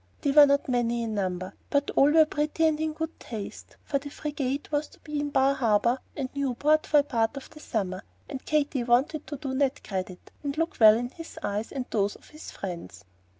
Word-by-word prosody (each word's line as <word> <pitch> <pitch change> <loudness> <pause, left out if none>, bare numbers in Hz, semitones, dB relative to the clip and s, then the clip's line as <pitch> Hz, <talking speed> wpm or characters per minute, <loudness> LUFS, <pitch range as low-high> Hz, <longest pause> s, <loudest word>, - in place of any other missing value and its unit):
They 285 - +1
were 290 0 +8
not 280 0 +2
many 240 -2 0
in 225 -1 -3
number, 185 -2 -2 0.2
but 285 0 +1
all 280 - +5
were 315 +1 +6
pretty 305 +2 0
and 310 -1 +2
in 315 0 -1
good 320 +1 -5
taste, 215 -4 -8
for 280 - -1
the 285 +1 -8
frigate 285 -1 -3
was 295 0 0
to - - -20
be 300 -1 -4
in 290 0 -1
Bar 270 0 +3
Harbor 235 0 +2 0.2
and 270 -3 -1
Newport 280 +3 +1
for 295 -1 +5
a - - -8
part 230 -2 0
of 275 - -9
the 305 - -13
summer, 190 -9 -3 0.3
and 270 -3 -6
Katy 295 -4 0
wanted 260 +6 +1
to 290 - -5
do 270 -2 -4
Ned 275 0 0
credit, 185 -2 -5
and 285 0 -4
look 330 +1 -1
well 215 -1 +9
in 245 +1 -3
his 330 +4 -11
eyes 210 +2 -2
and 265 -3 -3
those 205 -1 +1
of - - -18
his 305 - -10
friends. 105 - -7
275 Hz, 220 wpm, -27 LUFS, 225-295 Hz, 0.3 s, well